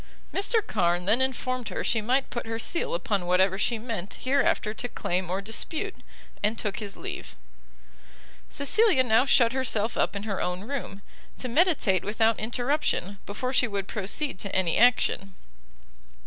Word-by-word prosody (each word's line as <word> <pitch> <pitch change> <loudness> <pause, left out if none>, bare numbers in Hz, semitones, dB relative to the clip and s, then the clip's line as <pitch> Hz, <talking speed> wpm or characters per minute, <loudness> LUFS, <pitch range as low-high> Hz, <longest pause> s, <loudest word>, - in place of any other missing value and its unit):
Mr 420 +2 +2
Carn 175 -3 +1
then 220 +6 +3
informed 255 -2 -1
her - - -3
she 225 - +1
might 255 +5 0
put 235 -1 -4
her 225 0 -3
seal 230 - 0
upon 180 +1 -1
whatever 190 +2 +3
she 235 +2 +1
meant 220 -5 -5
hereafter 260 -5 +1
to 245 - -4
claim 180 -4 -2
or 190 +2 -1
dispute, 320 - -2 0.5
and 215 +2 0
took 210 -1 -2
his 205 -3 -7
leave. - - -7 1.1
Cecilia 290 - +3
now 235 +2 +3
shut 235 -3 +5
herself 230 -4 0
up - - +1
in 200 - -4
her 205 -3 -3
own 180 +1 -2
room, 215 -4 -6 0.3
to 255 - -4
meditate 265 - +2
without 220 +2 +1
interruption, 240 - -1
before 255 +6 -3
she 255 -1 +3
would 200 -3 -3
proceed 210 +4 -2
to 200 - -4
any 180 -3 +2
action. 205 -4 +3
225 Hz, 160 wpm, -27 LUFS, 195-255 Hz, 1.1 s, shut